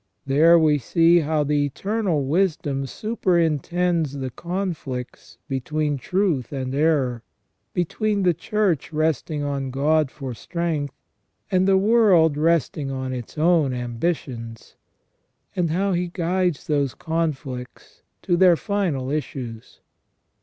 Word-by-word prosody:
There 155 Hz, +5 st, +5 dB
we 155 Hz, -3 st, +3 dB
see 165 Hz, +7 st, +4 dB
how 155 Hz, -1 st, 0 dB
the 145 Hz, 0 st, +1 dB
Eternal 180 Hz, -, -1 dB
Wisdom 145 Hz, -4 st, 0 dB
superintends 175 Hz, -, 0 dB
the 135 Hz, -2 st, -4 dB
conflicts 165 Hz, -8 st, -5 dB
between 145 Hz, +1 st, -2 dB
truth 175 Hz, -, 0 dB
and 130 Hz, -2 st, -3 dB
error, 140 Hz, -5 st, +1 dB, 0.5 s
between 200 Hz, +4 st, 0 dB
the 180 Hz, -1 st, +4 dB
Church 190 Hz, -3 st, -1 dB
resting 155 Hz, -1 st, -1 dB
on 140 Hz, -2 st, -2 dB
God 145 Hz, +2 st, +2 dB
for 135 Hz, -2 st, -7 dB
strength, 155 Hz, -, -3 dB, 0.6 s
and 185 Hz, 0 st, +3 dB
the 195 Hz, -1 st, +5 dB
world 195 Hz, -7 st, +4 dB
resting 155 Hz, -2 st, +1 dB
on 130 Hz, -1 st, -3 dB
its 125 Hz, +3 st, -7 dB
own 155 Hz, -5 st, +3 dB
ambitions, 120 Hz, -2 st, -4 dB, 0.8 s
and 175 Hz, -3 st, +1 dB
how 190 Hz, +4 st, 0 dB
He 175 Hz, 0 st, 0 dB
guides 175 Hz, -1 st, -1 dB
those 140 Hz, -4 st, 0 dB
conflicts 145 Hz, -7 st, -4 dB, 0.2 s
to 175 Hz, -, +2 dB
their 180 Hz, -1 st, +6 dB
final 165 Hz, -10 st, -2 dB
issues. 125 Hz, -6 st, -5 dB
155 Hz, 120 wpm, -23 LUFS, 135-175 Hz, 0.8 s, their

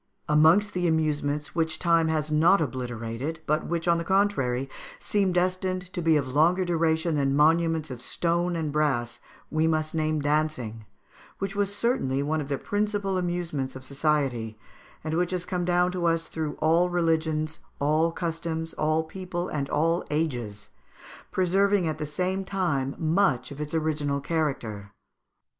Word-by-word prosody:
Amongst 160 Hz, +8 st, +4 dB
the 180 Hz, -1 st, 0 dB
amusements 150 Hz, -2 st, 0 dB
which 160 Hz, -1 st, 0 dB
time 165 Hz, -2 st, +3 dB
has 155 Hz, -1 st, -1 dB
not 165 Hz, +6 st, +5 dB
obliterated, 125 Hz, +1 st, -3 dB
but 150 Hz, +1 st, 0 dB
which, 170 Hz, 0 st, -2 dB
on 170 Hz, -1 st, +4 dB
the -, -, -2 dB
contrary, 165 Hz, -10 st, +1 dB, 0.3 s
seem 200 Hz, -3 st, +1 dB
destined 185 Hz, 0 st, -1 dB
to 175 Hz, -, -2 dB
be 160 Hz, -2 st, +4 dB
of 140 Hz, -3 st, -1 dB
longer 175 Hz, +5 st, +3 dB
duration 165 Hz, -1 st, +1 dB
than 140 Hz, -2 st, +1 dB
monuments 160 Hz, 0 st, +3 dB
of 125 Hz, -1 st, -7 dB
stone 175 Hz, +5 st, 0 dB
and 160 Hz, -3 st, -2 dB
brass, 140 Hz, -6 st, 0 dB, 0.3 s
we 155 Hz, +1 st, +2 dB
must 155 Hz, -1 st, 0 dB
name 155 Hz, -1 st, 0 dB
dancing, 145 Hz, -7 st, -1 dB, 0.5 s
which 195 Hz, +1 st, -4 dB
was 200 Hz, 0 st, 0 dB
certainly 140 Hz, -, 0 dB
one 155 Hz, +2 st, 0 dB
of 140 Hz, -, -6 dB
the 140 Hz, -, 0 dB
principal 205 Hz, 0 st, -1 dB
amusements 175 Hz, -7 st, -2 dB
of 130 Hz, -, -8 dB
society, 135 Hz, -6 st, -1 dB, 0.5 s
and 155 Hz, 0 st, -3 dB
which 175 Hz, +1 st, +1 dB
has 180 Hz, -1 st, -3 dB
come 180 Hz, -1 st, -2 dB
down 180 Hz, 0 st, +2 dB
to 180 Hz, -2 st, -1 dB
us 165 Hz, 0 st, +1 dB
through 155 Hz, -2 st, -4 dB
all 165 Hz, +3 st, +3 dB
religions, 160 Hz, -2 st, 0 dB, 0.2 s
all 155 Hz, +3 st, +2 dB
customs, 165 Hz, -1 st, -3 dB
all 155 Hz, +1 st, +1 dB
people, 180 Hz, +1 st, -5 dB
and 140 Hz, -2 st, -3 dB
all 165 Hz, +3 st, +1 dB
ages, 120 Hz, -10 st, -2 dB, 0.6 s
preserving 190 Hz, 0 st, +2 dB
at 155 Hz, -1 st, -3 dB
the 150 Hz, -, -3 dB
same 185 Hz, +5 st, -1 dB
time 170 Hz, -9 st, -1 dB
much 155 Hz, -7 st, +1 dB
of 140 Hz, +1 st, -7 dB
its 150 Hz, +2 st, -4 dB
original 150 Hz, -3 st, 0 dB
character. 125 Hz, -10 st, -3 dB
160 Hz, 155 wpm, -26 LUFS, 145-175 Hz, 0.6 s, not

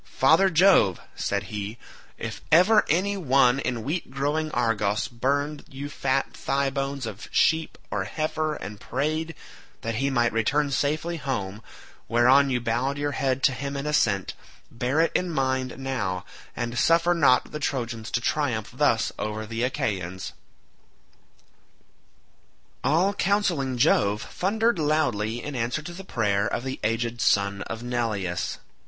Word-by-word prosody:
"Father 160 Hz, +8 st, +4 dB
Jove," 165 Hz, -, +5 dB, 0.2 s
said -, -, -1 dB
he, 105 Hz, +2 st, -4 dB, 0.4 s
"if -, -, -6 dB
ever 185 Hz, +7 st, +6 dB
any 195 Hz, +5 st, +1 dB
one 135 Hz, -6 st, +3 dB
in 120 Hz, -4 st, -2 dB
wheat 155 Hz, +5 st, -3 dB
growing 145 Hz, +4 st, -1 dB
Argos 115 Hz, -4 st, 0 dB
burned 140 Hz, +5 st, -1 dB
you 140 Hz, +2 st, -6 dB
fat 135 Hz, -2 st, -1 dB
thigh 140 Hz, 0 st, -1 dB
bones 135 Hz, -1 st, -3 dB
of 110 Hz, -2 st, -7 dB
sheep 160 Hz, 0 st, +2 dB
or 100 Hz, -2 st, -1 dB
heifer 155 Hz, +4 st, -2 dB
and 105 Hz, -6 st, -8 dB
prayed 155 Hz, +7 st, -2 dB, 0.5 s
that 115 Hz, -1 st, -3 dB
he 140 Hz, -, +2 dB
might 120 Hz, -3 st, +1 dB
return 140 Hz, +6 st, +1 dB
safely 155 Hz, +5 st, 0 dB
home, 105 Hz, -8 st, -3 dB, 0.5 s
whereon 125 Hz, +4 st, +5 dB
you 125 Hz, -2 st, +1 dB
bowed 120 Hz, +4 st, -1 dB
your 145 Hz, 0 st, -1 dB
head 135 Hz, -1 st, -1 dB
to -, -, +5 dB
him 140 Hz, +2 st, -4 dB
in 140 Hz, -, -4 dB
assent, 110 Hz, -10 st, +1 dB, 0.4 s
bear 125 Hz, +6 st, 0 dB
it 165 Hz, -, +2 dB
in 180 Hz, -, 0 dB
mind 130 Hz, -4 st, -1 dB
now, 105 Hz, -9 st, -3 dB, 0.3 s
and 120 Hz, 0 st, -2 dB
suffer 170 Hz, +1 st, +4 dB
not 140 Hz, -7 st, +3 dB
the 150 Hz, -, -5 dB
Trojans 120 Hz, -6 st, -3 dB
to -, -, 0 dB
triumph 120 Hz, -4 st, -1 dB
thus 125 Hz, -6 st, +2 dB
over 110 Hz, 0 st, -3 dB
the 115 Hz, +1 st, -4 dB
Achaeans." 95 Hz, -7 st, -2 dB, 2.5 s
All 170 Hz, +9 st, +3 dB
counselling 175 Hz, -12 st, 0 dB
Jove 105 Hz, -3 st, +3 dB
thundered 220 Hz, +2 st, 0 dB
loudly 120 Hz, -8 st, 0 dB
in 145 Hz, -1 st, -5 dB
answer 125 Hz, +5 st, -2 dB
to 175 Hz, -, -7 dB
the 190 Hz, +3 st, -8 dB
prayer 105 Hz, -, 0 dB
of 120 Hz, -, -2 dB
the 130 Hz, 0 st, -4 dB
aged 115 Hz, +2 st, -1 dB
son 100 Hz, 0 st, +2 dB
of 115 Hz, +2 st, -6 dB
Neleus. 105 Hz, -8 st, -2 dB
130 Hz, 145 wpm, -25 LUFS, 115-150 Hz, 2.5 s, ever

